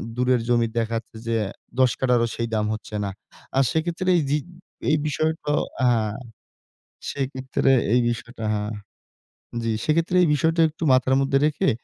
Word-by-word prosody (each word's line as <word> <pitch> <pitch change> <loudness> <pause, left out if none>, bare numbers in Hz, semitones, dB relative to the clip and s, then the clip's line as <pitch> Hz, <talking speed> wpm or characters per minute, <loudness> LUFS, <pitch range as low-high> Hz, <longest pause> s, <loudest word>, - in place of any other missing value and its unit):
দূরের 125 0 +2
জমি 120 -1 +3
দেখাচ্ছে 115 0 -3
যে 115 - +1 0.4
১০ 130 -2 +5
কাঠারও 125 -2 +2
সেই 115 - -2
দাম 105 -1 +1
হচ্ছে 110 0 -7
না। 100 - -2 0.5
আর 135 - +5
সেক্ষেত্রে 170 +3 -1
এই - - +2
জি 145 - +3 0.5
এই 155 - +4
বিষয়টাও 155 0 0 0.2
আ - - +5
হ্যাঁ, 110 -3 +1 1.0
সেক্ষেত্রে 135 -1 0 0.2
এই 125 - +5
বিষয়টা 120 0 -5
হ্যাঁ। 105 0 -2 0.9
জি, 115 - 0
সেক্ষেত্রে 165 +3 +1
এই - - +4
বিষয়টা 165 +2 +2
একটু 155 +2 -8
মাথার 130 +1 +3
মধ্যে 135 0 +2
রেখে 150 -1 +1
130 Hz, 150 wpm, -24 LUFS, 115-155 Hz, 1.0 s, ১০